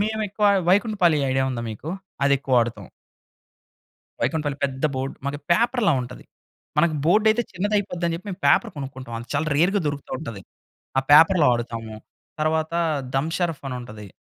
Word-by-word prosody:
మేమెక్కువ 210 -1 0 0.2
వైకుంఠపాళి 190 -5 +3
idea 130 0 +1
ఉందా 120 -2 -4
మీకు? 110 +8 -8 0.4
అదెక్కువ 135 -3 +3
ఆడుతాం. 115 -4 -3 1.3
వైకుంఠపాళి 145 +3 -1
పెద్ద 135 0 -3
బోర్డ్ 130 +1 -3
మనకు 145 +1 -4
పేపర్‌ల 235 +1 +2
ఉంటది. 125 0 -10 0.5
మనకు 160 0 +3
బోర్డ్ 210 +7 +3
అయితే 240 +2 +1
చిన్నదయిపోద్ది 200 -2 -1
అని 170 - -1
జెప్పి 180 - -13
మేం 185 - -4
పేపర్ 230 - +4
కొనుక్కుంటాం. 130 -3 -7
అది 120 - -11
చాలా 150 +3 0
రేర్‌గా 185 +6 +3
దొరుకుతూ 145 -1 -4
ఉంటది. 115 -10 -7 0.6
ఆ - - +5
పేపర్‌లో 160 +2 +7
ఆడుతాము. 115 -2 -5 0.5
తర్వాత 160 +1 0 0.4
దమ్ 145 +4 0
షరఫ్ 170 -4 -2
అని 125 - -4
ఉంటది. 105 -3 -10
150 Hz, 150 wpm, -23 LUFS, 130-185 Hz, 1.3 s, పేపర్‌లో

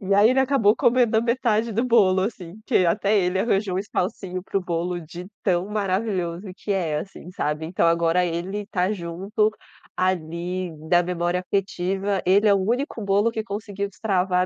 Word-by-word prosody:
E 195 -1 -2
aí 205 +3 +6
ele 260 +1 +3
acabou 255 -6 +3
comendo 240 -2 +3
a 220 - +4
metade 235 -2 +1
do 230 +4 0
bolo 200 -6 +4
assim, 195 -1 -5
que 205 -8 +3
até 205 +4 +2
ele 180 0 +1
arranjou 195 -3 +1
um - - 0
espacinho 185 -2 -3
para 195 - -1
o - - -5
bolo, 175 0 -2
de 170 +2 -9 0.2
tão 180 -1 +1
maravilhoso 195 -3 -2
que 205 - -3
é, 165 -6 0
assim, 180 0 -9
sabe? 150 -3 -2
Então 170 +1 +1
agora 170 +1 +3
ele 175 +4 -3
está 195 -1 -1
junto, 195 +4 -1 0.5
ali 180 0 -2 0.2
da 175 0 +5
memória 175 0 -1
afetiva, 195 +1 -1
ele 200 +4 +4
é 205 - +6
o - - +2
único 235 +3 -1
bolo 200 +3 +2
que 220 -1 -3
conseguiu 200 -1 -4
destravar 185 -3 0
190 Hz, 180 wpm, -23 LUFS, 180-210 Hz, 0.5 s, aí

